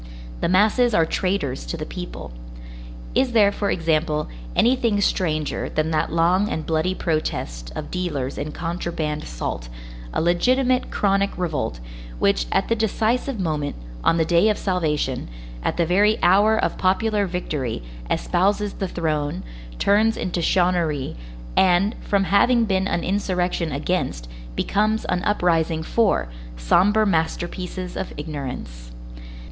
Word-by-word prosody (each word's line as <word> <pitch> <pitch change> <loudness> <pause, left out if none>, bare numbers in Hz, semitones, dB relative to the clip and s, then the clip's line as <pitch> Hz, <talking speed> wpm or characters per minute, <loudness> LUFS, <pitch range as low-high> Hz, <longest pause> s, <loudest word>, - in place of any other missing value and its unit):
The - - 0
masses 215 +5 +3
are 165 - +4
traitors 180 -7 -1
to 170 - -3
the 155 - -4
people. 180 - -7 0.8
Is 260 -2 +2
there, 205 -3 +5
for 200 0 -2
example, 155 -2 0 0.3
anything 235 -4 +3
stranger 155 -6 0
than 155 +1 -1
that 155 -1 0
long 180 +5 +2
and 160 - -3
bloody 165 +3 0
protest - - -2
of - - -6
dealers 150 -8 -2
in 150 +1 -4
contraband 165 -2 -3
salt, - - -5 0.4
a - - -1
legitimate 250 +10 +2
chronic 200 0 +1
revolt, 160 - -2 0.4
which, - - +2
at - - +1
the 230 - +2
decisive 225 +3 0
moment, 155 -5 -2 0.3
on 165 - +3
the 165 - +2
day 170 +6 +4
of 210 - +1
salvation, 150 - -1 0.3
at - - -1
the 170 - +2
very 205 +6 +3
hour 205 +5 +5
of - - -1
popular 205 +2 +2
victory, 150 - -3 0.3
espouses 200 +3 +1
the 195 - -3
throne, 155 -4 -2 0.3
turns 215 +3 +3
into 180 -1 -2
chouannerie, 170 -6 +1 0.4
and, 190 +3 +4
from 200 -1 +1
having 230 +5 +4
been 190 -2 +1
an 170 - -1
insurrection 180 -4 -1
against, 140 - -2 0.3
becomes 215 - +1
an 180 - 0
uprising 165 -5 +1
for, 205 - +1 0.3
sombre 205 - +3
masterpieces 180 +1 -2
of - - -4
ignorance! 125 - -6
180 Hz, 135 wpm, -23 LUFS, 155-205 Hz, 0.8 s, there